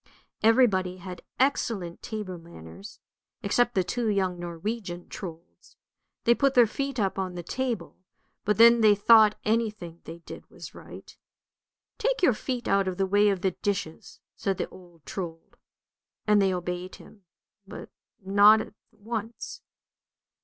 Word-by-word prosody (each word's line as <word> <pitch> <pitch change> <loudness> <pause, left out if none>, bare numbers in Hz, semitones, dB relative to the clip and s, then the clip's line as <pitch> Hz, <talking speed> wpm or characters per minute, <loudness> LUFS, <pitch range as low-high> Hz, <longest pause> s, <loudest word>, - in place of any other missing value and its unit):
Everybody 210 -6 +3
had 180 -1 -9 0.2
excellent 225 -10 0
table 205 -5 -6
manners, 170 - -12 0.4
except 245 0 +1
the 190 - +3
two 230 +5 -2
young 190 -3 0
Norwegian 175 +1 -5
Trolds; 170 -2 -10 0.5
they 235 - +5
put 275 +2 +1
their 245 -2 +7
feet 275 +3 -4
up 195 -2 0
on 185 -2 -3
the 175 - -6
table, 255 +5 -3 0.5
but 210 - +1
then 235 +1 +7
they 210 -2 +6
thought 215 +1 +6
any 225 +1 +2
thing 175 -5 -11
they 165 - -8
did 170 - -12
was - - -11
right. - - -12 0.4
" - - -66
Take - - 0
your 265 - +5
feet 245 +2 -4
out 195 -1 +2
of 185 -1 -3
the 195 - +1
way 205 +2 +3
of 195 -3 -1
the 190 - +1
dishes," 190 -3 -4 0.2
said 195 -2 -2
the - - -2
old 175 -4 -17
Trold, 165 -4 -7 0.7
and 210 -1 +4
they 195 -1 +3
obeyed 180 0 -4
him, 200 -4 -17 0.4
but - - -10 0.3
not 205 +3 +7
at - - -7 0.2
once. 225 +1 -6
200 Hz, 155 wpm, -27 LUFS, 180-225 Hz, 0.7 s, their